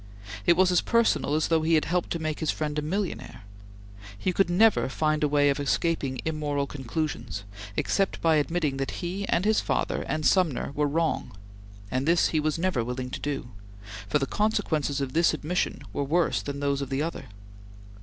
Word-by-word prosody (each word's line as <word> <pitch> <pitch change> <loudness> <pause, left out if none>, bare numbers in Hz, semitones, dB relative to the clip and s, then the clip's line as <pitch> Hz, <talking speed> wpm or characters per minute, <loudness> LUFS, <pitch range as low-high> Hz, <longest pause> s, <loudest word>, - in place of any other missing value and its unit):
It 170 - +6
was 185 0 +4
as 180 - +4
personal 230 - +2
as 155 - +1
though 165 -1 +3
he 160 +1 +3
had 155 - +2
helped 175 +2 -1
to - - -1
make 155 -2 -3
his 160 - -1
friend 150 -1 -1
a - - -2
millionaire. 150 - -4 0.7
He 180 - -1
could 195 0 +2
never 205 -4 +4
find 155 +2 0
a - - +4
way 145 0 +3
of 140 - -2
escaping 140 -3 0
immoral 150 -3 -1
conclusions, 135 -5 -4 0.3
except 195 -1 0
by 160 -2 +3
admitting 150 -2 0
that 135 +6 -3
he 195 +3 -3
and 180 - +2
his 215 0 +3
father - - -1
and 155 -1 -2
Sumner 165 -10 +2
were 150 0 +1
wrong, 160 -8 -1 0.5
and 130 +3 -1
this 170 +1 +4
he 155 - +1
was 155 0 0
never 165 -8 0
willing 125 +1 -4
to - - -4
do, 140 -4 -3 0.6
for 150 - +3
the 140 - 0
consequences 155 -9 0
of 130 -2 -3
this 165 -1 +3
admission 170 +4 -2
were 145 - -1
worse 165 +5 +1
than 140 0 -5
those 140 -1 0
of 140 - -4
the 135 +2 0
other. 165 - -4
155 Hz, 195 wpm, -27 LUFS, 140-170 Hz, 0.7 s, It